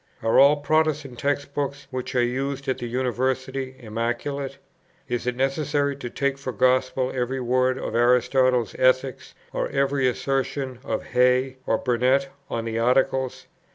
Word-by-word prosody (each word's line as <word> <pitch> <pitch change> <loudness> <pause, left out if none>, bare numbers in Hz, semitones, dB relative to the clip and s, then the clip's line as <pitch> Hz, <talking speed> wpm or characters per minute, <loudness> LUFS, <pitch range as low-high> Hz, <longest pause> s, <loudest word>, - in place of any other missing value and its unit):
Are 115 - +4
all 140 +2 +7
Protestant 150 -3 0
text 140 0 -1
books, 140 0 -3
which 130 0 -4
are 125 - +4
used 135 +3 -2
at 130 -1 -1
the 120 - -4
University, 130 +2 -2
immaculate? 120 +5 -3 0.5
Is 120 0 -3
it 125 - 0
necessary 140 +1 0
to 125 -3 -6
take 140 +2 -1
for 135 -2 -4
gospel 130 +2 +2
every 130 +1 -2
word 130 +1 +1
of - - -4
Aristotle's 125 0 +3
Ethics, 130 0 +1 0.2
or - - -1
every 135 -1 +1
assertion 135 0 -2
of - - -2
Hey 125 +1 +2
or 110 - +2
Burnett 130 +4 +1 0.2
on 115 -1 -3
the 115 0 -2
Articles? 130 +2 +1
130 Hz, 150 wpm, -24 LUFS, 125-135 Hz, 0.5 s, all